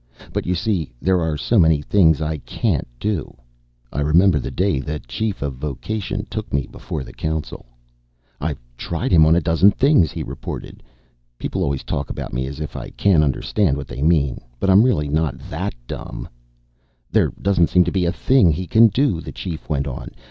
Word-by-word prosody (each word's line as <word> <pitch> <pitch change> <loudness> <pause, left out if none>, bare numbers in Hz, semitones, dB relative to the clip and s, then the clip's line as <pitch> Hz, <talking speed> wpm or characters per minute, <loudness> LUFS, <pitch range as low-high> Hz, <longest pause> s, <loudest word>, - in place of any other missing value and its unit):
But, - - -2
you 90 - +1
see, 90 - -1
there 95 +2 +2
are 80 -2 -1
so 115 +8 +2
many 80 -3 +5
things 80 -4 +4
I 80 0 -2
can't - - -1
do. 95 - -3 0.6
I 75 - -1
remember 80 +3 +4
the - - -4
day 95 -6 0
the 75 +3 -3
Chief 105 - -3
of 70 -3 -4
Vocation 100 - -4
took 110 -1 -5
me 70 -1 0
before - - -6
the - - -11
council. 80 -5 -4 0.7
"I've 75 -1 -3 0.2
tried - - -3
him 80 -3 +6
on 80 - +5
a 85 - +3
dozen 85 +4 +4
things," 130 - +3
he - - -4
reported. - - -7 0.6
People - - -3
always 70 -1 -1
talk 70 - -3
about - - -5
me 65 +2 -1
as 70 +3 -7
if 75 - -5
I - - -6
can't 90 -6 +3
understand 70 - +1
what 70 - -6
they - - -7
mean. 75 -4 +2 0.2
But 95 - +2
I'm 95 +2 +7
really 95 - +2
not 75 +1 0
that - - -3
dumb. - - -7 0.8
"There - - +3
doesn't 95 -4 +3
seem 90 - +5
to 85 - -2
be 95 -2 +1
a 85 - +2
thing 100 +1 +4
he 90 +4 -2
can 110 +6 +6
do," 110 - +1
the - - -7
Chief 85 -4 -6
went 70 -3 0
on. 65 -4 -6
80 Hz, 195 wpm, -21 LUFS, 75-95 Hz, 0.8 s, I'm